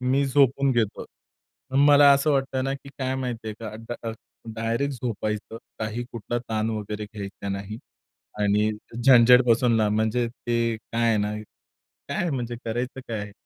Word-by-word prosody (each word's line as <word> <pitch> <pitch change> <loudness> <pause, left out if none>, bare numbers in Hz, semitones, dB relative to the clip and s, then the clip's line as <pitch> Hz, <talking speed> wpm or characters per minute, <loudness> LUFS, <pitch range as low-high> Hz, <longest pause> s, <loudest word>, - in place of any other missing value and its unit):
मी 130 +2 +2
झोपून 135 0 +3
घेतो. 115 -4 -1 0.8
मला 145 -1 +8
असं 140 +2 +2
वाटतं 135 -2 0
ना 135 - -1
की 140 0 -11
काय 130 0 -1
माहिती 120 -4 -4
आहे 105 - -5
का, 115 - -5
अ, 110 - -7
ड - - -3 0.2
अ, 115 - -3 0.4
डायरेक्ट 115 +5 -1
झोपायचं. 110 -2 -3 0.2
काही 110 +2 -3
कुठला 115 +1 -3
ताण 110 -2 -2
वगैरे 105 -1 -4
घ्यायचा 100 -1 -7
नाही 100 +3 -5 0.6
आणि 105 +1 +2 0.3
झंझटपासून 125 -2 +6
लांब 105 -1 +2
म्हणजे 110 +2 +1
ते 115 -1 -1
काय 115 +1 -1
आहे 115 - +3
ना, 105 +1 -1 0.8
काय 175 -2 -1
म्हणजे 120 -3 -3
करायचं 120 +3 -3
काय 110 -3 -3
आहे? 105 0 -7
115 Hz, 160 wpm, -25 LUFS, 110-130 Hz, 0.8 s, मला